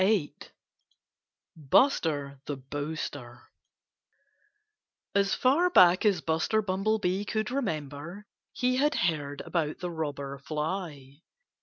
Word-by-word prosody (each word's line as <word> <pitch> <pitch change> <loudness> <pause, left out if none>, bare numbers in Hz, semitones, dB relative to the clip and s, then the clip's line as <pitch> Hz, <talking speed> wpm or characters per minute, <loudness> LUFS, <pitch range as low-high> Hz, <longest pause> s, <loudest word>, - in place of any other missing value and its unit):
VIII 195 -7 +2 1.2
BUSTER 145 - +2
THE 145 - -4
BOASTER 140 -2 -6 1.6
As 200 0 +2
far 300 +8 +3
back 185 - +6
as 190 -5 +2
Buster 160 +8 +1
Bumblebee 195 0 0
could 215 +2 -2
remember, 170 - -4 0.3
he 255 0 0
had 295 +3 +2
heard 145 -4 -1
about 155 -4 -2
the 180 -1 -4
Robber 140 -4 -4
Fly. 150 -1 -5
165 Hz, 100 wpm, -28 LUFS, 145-205 Hz, 1.6 s, back